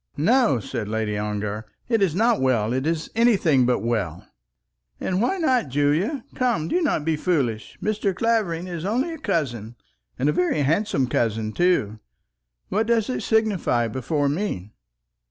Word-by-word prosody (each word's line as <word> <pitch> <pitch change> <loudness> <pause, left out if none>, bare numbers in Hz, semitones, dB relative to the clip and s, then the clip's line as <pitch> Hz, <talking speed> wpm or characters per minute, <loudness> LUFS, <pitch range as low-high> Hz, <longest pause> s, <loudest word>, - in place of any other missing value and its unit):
"No," 225 - +3
said 115 0 -4
Lady 110 -1 -2
Ongar, 105 +1 -3 0.2
"it 225 -3 +1
is 180 -5 +2
not 230 - +2
well. 120 -4 +1
It 130 +3 -1
is 165 -1 -2
anything 190 - +3
but 125 - +1
well." 100 -8 -2 0.7
"And 185 +1 -1
why 315 +12 +1
not 260 -8 +2
well, - - -12
Julie? 150 - +1
Come, 240 -12 0
do 360 - +1
not 280 - 0
be 160 -1 +1
foolish. 140 -10 -1
Mr. 210 -2 0
Clavering 210 -7 0
is 170 -3 -5
only 250 - 0
a 325 - -8
cousin, 120 - -2 0.4
and 130 - 0
a - - +4
very 175 -3 +1
handsome 155 -2 +1
cousin, 110 -2 -1
too. 110 - +1 0.7
What 220 +3 0
does 230 0 +1
it - - -3
signify 205 - +1
before 140 +5 -1
me?" 140 - -2
160 Hz, 160 wpm, -23 LUFS, -, 0.7 s, a